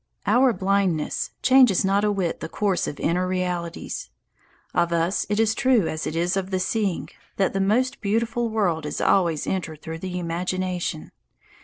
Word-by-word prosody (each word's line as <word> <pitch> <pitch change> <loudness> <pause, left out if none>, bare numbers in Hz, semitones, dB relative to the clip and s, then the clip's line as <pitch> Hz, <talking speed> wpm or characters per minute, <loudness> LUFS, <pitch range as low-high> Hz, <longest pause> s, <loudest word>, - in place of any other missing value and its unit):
Our 245 +5 +4
blindness 195 -6 0
changes 255 -8 +5
not 200 +1 +2
a 210 - +2
whit 190 -4 -1
the - - -6
course 200 -1 0
of 145 - -6
inner 180 +3 0
realities. 180 -2 -3 0.6
Of 170 -1 +1
us 170 +3 0
it 205 +1 0
is 225 -1 +4
as - - 0
true 250 -7 +3
as 155 0 -3
it 155 - -4
is 175 +2 +1
of 190 -1 -2
the 190 -1 -1
seeing 200 -1 -1 0.3
that 195 - +1
the 195 - 0
most 240 +7 +1
beautiful 230 +3 0
world 180 -8 0
is - - -4
always 170 -6 +2
entered 160 -5 -4
through 160 0 -6
the 180 0 -4
imagination. 180 -1 -3
185 Hz, 175 wpm, -24 LUFS, 170-210 Hz, 0.6 s, changes